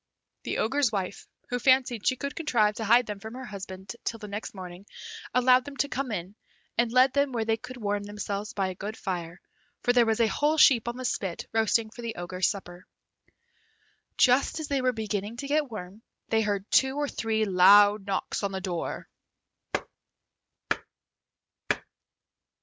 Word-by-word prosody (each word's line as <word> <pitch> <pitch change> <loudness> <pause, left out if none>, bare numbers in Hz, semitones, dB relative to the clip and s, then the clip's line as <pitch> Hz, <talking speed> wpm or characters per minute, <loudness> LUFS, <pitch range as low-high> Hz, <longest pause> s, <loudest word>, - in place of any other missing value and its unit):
The - - -2
Ogre's 260 +2 +2
wife, 195 -2 -4 0.2
who 245 - -1
fancied 255 -4 +3
she 255 - +4
could 280 +3 -5
contrive 235 -10 +2
to 225 - -3
hide 235 +3 +5
them 210 -2 -6
from 220 +3 -8
her 260 0 -7
husband 190 -1 -8
till 230 - -2
the 215 -2 -9
next 205 +1 -6
morning, 185 +1 -9 0.4
allowed 250 +1 +5
them 285 0 -9
to 285 - +1
come 275 -3 -3
in, 185 -1 -4 0.4
and 235 -1 +2
led 255 +2 +5
them 280 -1 +2
where 225 -2 -1
they 225 0 +2
could 250 +3 -9
warm 205 -3 -1
themselves 205 0 -4
by 195 -2 0
a - - -4
good 205 +4 -6
fire, 175 -2 -4 0.4
for 245 - +3
there 240 -2 +4
was 225 +1 +1
a 230 - +5
whole 295 +7 +1
sheep 245 -6 +6
on 240 +1 -3
the 255 - -5
spit 190 -7 -2
roasting 225 0 +2
for 240 - -10
the 230 -1 -4
Ogre's 180 +1 -1
supper. 180 -3 -6 1.3
Just 255 +5 +4
as 310 - -4
they 280 -2 +1
were 255 0 +2
beginning 215 -1 -3
to 275 +3 -5
get 295 -1 +1
warm, 205 -1 -8 0.3
they 225 0 +3
heard 205 -2 -1
two 265 0 +4
or 290 0 0
three 220 -4 -1
loud 205 +2 +6
knocks 195 +1 -2
at 200 - +1
the 190 - -3
door. 180 -3 -4
220 Hz, 180 wpm, -27 LUFS, 200-250 Hz, 1.3 s, sheep